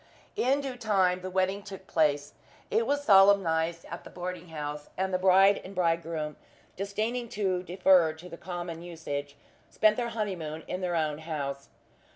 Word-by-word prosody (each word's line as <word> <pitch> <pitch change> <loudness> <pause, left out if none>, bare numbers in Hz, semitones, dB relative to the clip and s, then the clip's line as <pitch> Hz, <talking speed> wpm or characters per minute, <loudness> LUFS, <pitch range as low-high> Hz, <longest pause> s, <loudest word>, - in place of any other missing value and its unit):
In 270 +3 +2
due 265 -3 -5
time 190 -5 +2
the 185 - -5
wedding 190 +2 0
took 195 -2 -10
place. 145 -4 +1 0.4
It 455 +1 +2
was 285 0 0
solemnized 185 - +4
at 170 - -8
the - - -11
boarding 180 0 -6
house; 150 -2 -6
and 190 0 -1
the 185 - +2
bride 195 +2 +5
and 195 +1 -10
bridegroom 165 -3 -1 0.4
disdaining 220 +5 -2
to 190 -3 +1
defer 180 -2 +4
to 160 +3 -12
the 175 - -8
common 175 -2 -6
usage, 145 -5 -5 0.3
spent 215 0 +3
their 240 -1 -1
honeymoon 180 -9 -4
in 185 - -4
their 180 -1 -1
own 155 -2 0
house. 140 -4 -5
180 Hz, 165 wpm, -29 LUFS, 160-195 Hz, 0.4 s, bride